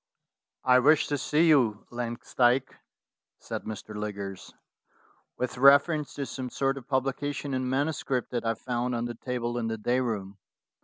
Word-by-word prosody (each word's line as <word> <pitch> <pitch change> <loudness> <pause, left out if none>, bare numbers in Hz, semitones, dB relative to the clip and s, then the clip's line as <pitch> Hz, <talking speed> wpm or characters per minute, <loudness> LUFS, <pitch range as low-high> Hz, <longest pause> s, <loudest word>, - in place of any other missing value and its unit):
"I 125 -1 +6
wish 150 +4 +5
to 145 - 0
see 155 +5 +2
you, 120 -9 +3
Langsdyke," 120 +2 0 0.6
said - - -6
Mr. 110 0 -7
Liggers, 100 -2 -5 0.9
"with 125 0 -3
reference 140 +3 +5
to 140 - -3
some 130 -1 -5
sort 135 +2 -1
of 125 - -18
publication 140 +1 -1
in 130 -1 -1
manu 140 +4 +1
script 130 -4 -3
that 120 -2 -2
I 115 0 0
found 125 +1 -2
on 120 0 -1
the 120 - -4
table 120 0 -3
in 115 - -2
the 110 0 -2
day 120 +4 +1
room. 100 -5 -3
125 Hz, 160 wpm, -28 LUFS, 115-135 Hz, 0.9 s, I